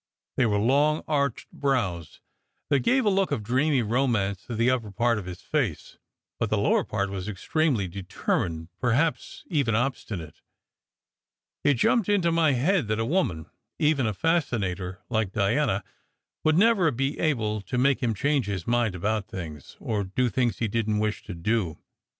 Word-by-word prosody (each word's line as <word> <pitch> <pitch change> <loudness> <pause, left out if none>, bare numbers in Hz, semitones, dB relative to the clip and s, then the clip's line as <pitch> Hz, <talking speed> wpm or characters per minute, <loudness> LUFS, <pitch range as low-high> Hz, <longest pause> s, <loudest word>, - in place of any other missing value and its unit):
They 125 - +3
were 105 -2 +1
long, 145 +8 +2
arched 140 -5 -1
brows 105 - -2 0.5
that 140 -2 +3
gave 255 - +2
a - - +5
look 195 0 +2
of 105 - -1
dreamy 130 +4 +2
romance 110 -5 0
to 120 - -4
the 115 +3 +3
upper 120 -4 -1
part 115 +3 +1
of 95 - -8
his 90 0 -7
face, - - -2 0.4
but - - 0
the - - +1
lower - - +2
part 100 -2 -2
was 95 -1 -5
extremely 115 - 0
determined, 85 -3 -2
perhaps 125 +3 0
even 140 -9 +1
obstinate. 105 - -3 1.2
It 145 - +4
jumped 210 - +2
into 185 -5 +3
my 165 -3 +3
head 150 - +1
that 110 0 0
a 115 - 0
woman 115 - 0 0.3
even 150 -6 +2
a 110 - -1
fascinator 100 - -1
like 110 -5 0
Diana 110 0 +1 0.6
would 155 +1 +3
never 200 -4 +4
be 135 +2 -2
able 110 -9 0
to 100 +6 -4
make 135 +2 +3
him 115 -3 0
change 140 0 +1
his 95 -4 -3
mind 120 -4 +1
about 105 +3 -1
things, 80 -8 -8
or 105 -2 -1
do 120 +7 0
things 120 +1 0
he 115 - 0
didn 110 0 0
t - - +1
wish 105 -1 -1
to - - -6
do. 85 -2 -1
115 Hz, 170 wpm, -26 LUFS, 100-140 Hz, 1.2 s, a